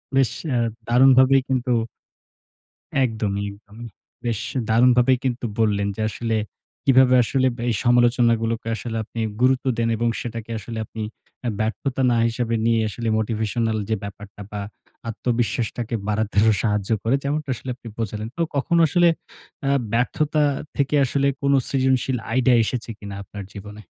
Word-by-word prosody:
বেশ 135 -3 +4 0.2
অ্যা 125 -4 0 0.3
দারুণভাবেই 130 +2 +6
কিন্তু 130 -1 0 1.3
একদমই, 105 -4 -1
একদম। 105 +1 -18 0.5
বেশ 115 -3 0 0.3
দারুণভাবেই 125 +2 +5
কিন্তু 120 -1 -1
বললেন 100 -2 +2
যে 110 - -4
আসলে, 115 0 -2 0.5
কিভাবে 130 -1 +6
আসলে 130 +2 +1
ব্য 120 - -8
এই 110 - +1
সমালোচনা 120 -1 +4
গুলোকে 115 0 -2
আসলে 115 -1 -4
আপনি 115 +1 -8 0.2
গুরুত্ব 130 +1 +3
দেন 115 0 +1
এবং 120 +1 0
সেটাকে 115 -1 -6
আসলে 115 +2 -7
আপনি 110 - -8 0.4
অ্যা 120 -3 -2
ব্যর্থতা 125 +5 -1
না 120 - +2
হিসাবে 115 0 -1
নিয়ে, 115 -1 +3
আসলে 115 +2 -5
মোটিভেশনাল 110 0 -1
যে 110 - +2
ব্যাপারটা 100 0 -9
বা 105 -1 -4 0.5
আত্মবিশ্বাসটাকে 120 0 -1
বাড়াতে 105 0 -1
আরো 110 0 +5
সাহায্য 105 -2 0
করে। 115 +4 +2
যেমনটা 145 0 -2
আসলে 130 - -8
আপনি 120 - -13
বোঝালেন। 110 -1 -3
তো - - -1
কখনো 170 +5 +2
আসলে 175 +4 +4 0.6
আ - - +2 0.2
ব্যর্থতা 150 +6 +1 0.3
থেকে 140 +1 +1
আসলে, 140 +2 +1
কোনো 140 0 +3
সৃজনশীল 130 -1 +1 0.2
আইডিয়া 130 -1 +4
এসেছে 120 +1 -3
কিনা 100 -1 -8
আপনার 100 0 -8
জীবনে? 105 +1 -9
120 Hz, 150 wpm, -22 LUFS, 110-130 Hz, 1.3 s, দারুণভাবেই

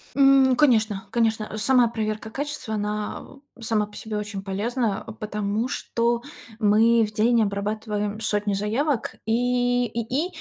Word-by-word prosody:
М. 270 -1 +5
Конечно, 220 -8 +2
конечно, 220 -2 0
сама 245 +2 +4
проверка 215 -1 -3
качества, 270 -2 -4
она, 210 0 -3 0.4
а, - - -16
сама 220 -2 +1
по 210 - -16
себе 220 -1 -4
очень 210 -1 -4
полезна, 210 +2 -1
а, - - -9
потому 210 +1 -2
что 235 -3 -1 0.4
мы 225 +2 +4
в 210 - -9
день 230 +2 +3
обрабатываем 210 +1 -2
сотни 210 -2 0
заявок 230 +6 -1
и 245 +1 +1
и 245 +9 -2
220 Hz, 140 wpm, -24 LUFS, 210-245 Hz, 0.4 s, М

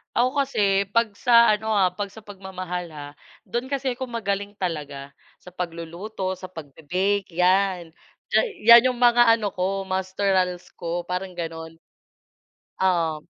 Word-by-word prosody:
Ako 250 +2 +3 0.2
kasi 200 -5 +1
pag 230 -2 +3
sa 235 -2 +6
ano 220 +1 0
ah 185 -3 +3
pag 200 +2 -4
sa 215 +2 -14
pagmamahal 185 -3 -6
ha 150 -3 -9 0.4
dun 240 +2 -4
kasi 270 -1 -1
ako 260 +1 -5
magaling 205 -3 -3
talaga 145 -7 -5 0.3
sa 180 - -12
pagluluto 180 +3 -5
sa 185 - -7
pagbi-bake 180 +4 -3
yan. 180 -2 +2 0.4
Diyan - - +4 0.2
yan 235 +2 +9
yung 245 - -9
mga 240 0 +5
ano 210 -4 -3
ko 195 +1 -2
Masterals 185 -1 -1
ko 170 +1 -3
parang 180 +1 -5
ganon. 165 -1 -6 1.0
Oo. 165 -5 0
190 Hz, 140 wpm, -24 LUFS, 175-210 Hz, 1.0 s, yan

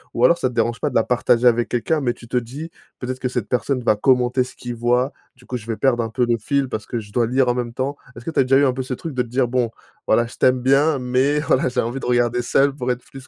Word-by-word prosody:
Ou 120 - +4
alors 170 +6 +5
ça 130 - +1
te 125 - -11
dérange 115 0 0
pas 150 - 0
de 125 - -10
la 115 - +4
partager 125 0 +2
avec 120 0 +2
quelqu'un, 150 +6 0
mais 120 -3 0
tu 120 - -15
te 125 +1 -1
dis: 140 +8 -5 0.3
«Peut-être 130 0 -4
que 125 - -2
cette 125 -5 -3
personne 125 0 -1
va 110 - +3
commenter 125 +2 +2
ce 125 - -12
qu'il 120 -1 -6
voit, 125 +3 +1 0.2
du 125 0 -21
coup 125 - -4
je 110 - -12
vais 115 -2 -3
perdre 130 -3 +2
un 115 - -4
peu 125 +3 0
le 120 -1 +2
fil 140 +3 0
parce 110 -3 -5
que 120 - -3
je 105 -2 -11
dois 120 -2 +2
lire 130 +1 +2
en - - +3
même 120 -1 -3
temps»? 135 +3 -3 0.2
Est-ce 115 - -11
que 165 - -3
tu - - -1
as 135 - +6
déjà 135 +1 +3
eu 140 - +4
un 130 - +2
peu 130 - -3
ce 130 0 -4
truc 160 +3 -7
de 130 - 0
te 125 - -4
dire: 125 +1 +1
«Bon, 125 -1 0 0.4
voilà, 115 +2 +3
je 120 - -12
t'aime 130 0 +3
bien, 140 +3 +3
mais 130 +4 +1
voilà, 135 -3 +1
j'ai - - 0
envie 120 +4 -3
de - - -7
regarder 120 0 +2
seule 135 +3 +2
pour 125 -3 -2
être 125 0 -4
plus 135 -1 -12
125 Hz, 310 wpm, -21 LUFS, 120-135 Hz, 0.4 s, as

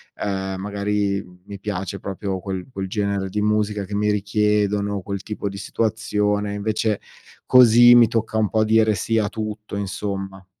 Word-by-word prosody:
ehm, 95 -1 -3
magari 100 0 -1 0.2
mi 100 -1 -8
piace 100 -2 -4
proprio 95 0 -4
quel 95 -1 -5
quel 95 -3 -4
genere 100 -1 -2
di 105 +2 -2
musica 105 -1 0
che 100 +1 -5
mi 105 0 +1
richiedono, 105 -1 0
quel 100 0 -5
tipo 105 -1 -4
di 100 - -8
situazione, 105 -1 -1
invece 105 +1 -1 0.5
così 120 -1 +8
mi 120 -2 +7
tocca 110 -1 -1
un 110 -2 +2
po' 110 -1 +2
dire 110 0 +3
sì 115 +4 -1
a 105 -1 +1
tutto, 110 -1 -6
insomma. 95 -1 -5
105 Hz, 160 wpm, -22 LUFS, 100-110 Hz, 0.5 s, così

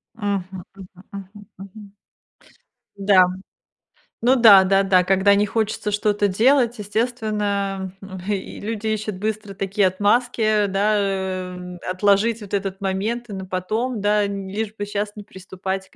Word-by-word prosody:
Мгм 195 -4 -4
мгм 195 -2 -11 0.2
мгм 200 +1 -10
мгм. 200 +1 -12 1.0
Да. 195 -2 +5 1.0
Ну 250 +3 +4
да-да-да, 195 -5 +6
когда 195 +2 +3
не 205 +1 +2
хочется 215 0 -2
что-то 205 0 +1
делать, 240 +4 +3
естественно, 205 -3 -2
м, 190 -1 -9
и 200 -2 -4
люди 220 0 -4
ищут 215 -1 -2
быстро 210 0 -4
такие 195 0 +1
отмазки, 215 +2 +1
да, 200 +2 +1
э, 185 -2 -3
отложить 205 +4 +2
вот 205 -1 -11
этот 195 -1 -2
момент 210 +5 -2
на 190 -3 -6
потом, 215 +6 -2
да, 205 0 +2
лишь 200 +2 -4
бы 205 - -4
сейчас 205 0 -4
не 210 - -9
приступать 190 0 -6
к - - -27
200 Hz, 130 wpm, -21 LUFS, 190-215 Hz, 1.0 s, да-да-да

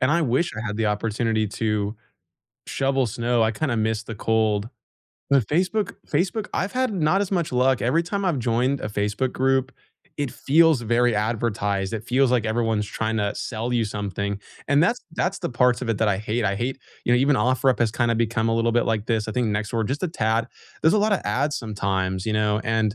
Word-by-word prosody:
and 130 +3 +2
I 170 +1 +3
wish 140 +5 +1
I 115 - -4
had 105 -1 -3
the 110 0 0
opportunity 110 +1 0
to 105 0 -2 0.7
shovel 135 -1 +1
snow, 120 +1 0
I 110 - +2
kinda 125 +2 -1
miss 110 +1 0
the 115 - -7
cold. 110 0 0 0.6
But 135 -6 +4
Facebook 185 +6 0
Facebook, 185 +7 -1
I've 200 - -1
had 255 -3 0
not 180 +1 +2
as 200 - -1
much 170 -6 0
luck, 130 +1 +2
every 145 +8 +2
time 200 +3 -3
I've 175 -7 +1
joined 125 +3 0
a - - -3
Facebook 105 +5 -1
group 135 0 +1 0.5
it 145 -3 -1
feels 155 -1 +3
very 120 +1 +2
advertised, 105 -2 -1
it 110 -1 -5
feels 130 +2 +2
like 125 -3 +2
everyone's 110 -1 0
trying 110 +2 -2
to 100 -1 -1
sell 115 +1 -3
you 120 -1 +2
something, 100 -1 -3 0.3
and 145 +2 +4
that's 230 +8 +2
that's 185 +3 -1
the - - -3
parts 125 0 +2
of 125 - -3
it 115 - +1
that 110 - +2
I 100 -2 +1
hate. 110 +3 -2
I 100 -1 +1
hate 130 +5 -2 0.3
you 120 - +3
know, - - +5
even 140 +2 +3
OfferUp 130 +1 +2
has 115 -2 +3
kinda 120 0 +1
become 115 0 0
a - - +1
little 115 0 +1
bit 120 +1 +2
like 110 -1 -1
this, 110 -2 0
I - - -2
think 125 0 0
Nextdoor 105 +1 -1
just 140 +6 -3
a - - 0
tad. 115 -5 0 0.3
There's 160 - +5
a 215 - +4
lotta 205 -2 +1
ads 145 +3 0
sometimes, 95 -3 -2
you 110 - 0
know, 105 0 +1
and 110 -2 +1
115 Hz, 215 wpm, -24 LUFS, 110-135 Hz, 0.7 s, know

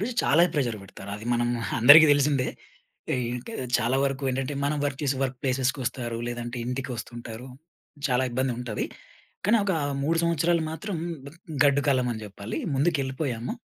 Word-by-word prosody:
వీళ్ళు 235 +5 -2
చాలా 160 +5 +4
ప్రెషర్ 125 -7 0
పెడతారు. 95 0 -10
అది 110 - -10
మనం 120 0 +1 0.3
అందరికి 150 +6 +10
తెలిసిందే. 140 -2 +2 0.7
ఏంటే 125 - -3 0.3
చాలా 120 +3 +1
వరకు 135 0 -2
ఏంటంటే 135 +2 -2
మనం 145 +2 0
వర్క్ 140 -2 -2
చేసే 140 -2 +1
వర్క్ 130 -1 -3
ప్లేస్‌కి 130 0 0
వస్తారు. 120 -1 -3
లేదంటే 120 0 -5
ఇంటికి 130 +2 -3
వస్తుంటారు. 120 +1 -8 0.6
చాలా 125 0 +2
ఇబ్బంది 130 +1 0
ఉంటది. 120 -4 -3 0.6
కానీ 225 +3 +5
ఒక 195 - +1 0.3
3 165 +3 +1
సంవత్సరాలు 170 0 +2
మాత్రం 185 +4 -4 0.3
బ్ 140 - -8 0.3
గడ్డు 140 0 +4
కాలం 130 -3 +3
అని 110 - -7
చెప్పాలి. 100 0 -6 0.2
ముందుకెళ్ళిపోయాము. 135 - -1
130 Hz, 155 wpm, -26 LUFS, 120-145 Hz, 0.7 s, అందరికి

